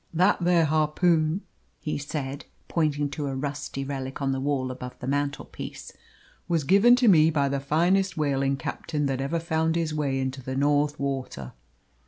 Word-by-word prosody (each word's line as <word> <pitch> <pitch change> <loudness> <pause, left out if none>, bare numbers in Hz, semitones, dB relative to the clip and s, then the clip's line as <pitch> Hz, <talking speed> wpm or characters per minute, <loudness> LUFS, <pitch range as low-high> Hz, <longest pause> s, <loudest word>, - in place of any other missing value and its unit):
"That 185 +2 +3
there 170 -2 +4
harpoon," 155 +3 +2 0.4
he 150 - -3
said, 140 -1 -5 0.2
pointing 150 -3 0
to 145 -1 -3
a 135 - -3
rusty 140 0 -4
relic 135 -1 -5
on 135 -1 0
the 135 - -1
wall 135 -2 -1
above 125 0 -8
the - - -8
mantelpiece, 140 +1 -4 0.6
"was 165 -3 +1
given 200 - +6
to 250 -1 +2
me 160 -5 +6
by 140 -3 +1
the 140 0 -1
finest 175 +6 +1
whaling 135 -2 +1
captain 150 +1 -3
that 135 -1 -1
ever 150 +5 -1
found 160 0 0
his 165 -2 -1
way 140 -3 -1
into 130 0 -3
the 130 +1 -5
North 145 +1 +1
water. 135 - -4
145 Hz, 170 wpm, -26 LUFS, 135-160 Hz, 0.6 s, given